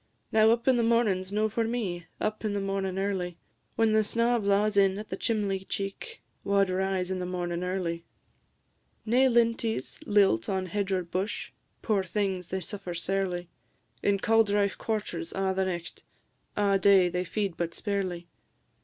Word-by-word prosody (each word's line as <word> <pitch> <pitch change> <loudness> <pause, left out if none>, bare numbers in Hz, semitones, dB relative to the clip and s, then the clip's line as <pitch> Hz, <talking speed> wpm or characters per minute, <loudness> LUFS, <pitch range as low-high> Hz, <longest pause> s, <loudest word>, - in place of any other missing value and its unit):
Now, 220 0 +5
up 235 +2 +1
in 260 -2 +5
the - - +3
mornin's 215 -5 +2
no 215 +1 +2
for 225 +2 -1
me, 200 -8 -3
Up 215 +1 -2
in 215 -2 -1
the 205 - 0
mornin' 195 -1 -2
early; 190 -3 -2 0.4
When 225 -1 +3
snaw 235 +3 +1
blaws 205 0 +2
in 195 -1 +4
at 210 +1 -7
the - - -3
chimley 205 -4 -1
cheek, 195 0 -5 0.2
Wha 200 0 +3
'd 190 - -2
rise 190 0 -1
in 185 - -2
the 180 - -3
mornin' 175 -1 -3
early? 180 -2 -2 1.0
Nae 250 +4 +4
linties 230 -2 +1
lilt 195 - +3
on 190 -1 0
hedge 200 +2 -2
or 185 -1 +1
bush: 185 +5 -3 0.3
Poor 210 -4 +2
things! 185 -1 -2
they 190 +1 -3
suffer 185 -1 -5
sairly; 180 0 -2 0.5
In 200 -1 +2
cauldrife 205 -1 +2
quarters 180 -7 -3
a' 190 0 0
the 190 0 +1
nicht, 175 -2 -5 0.6
A' 200 -1 +3
day 190 -2 +6
they 180 +1 -1
feed 195 0 -2
but 170 -1 -3
sparely. 185 -4 -3
195 Hz, 165 wpm, -28 LUFS, 185-215 Hz, 1.0 s, day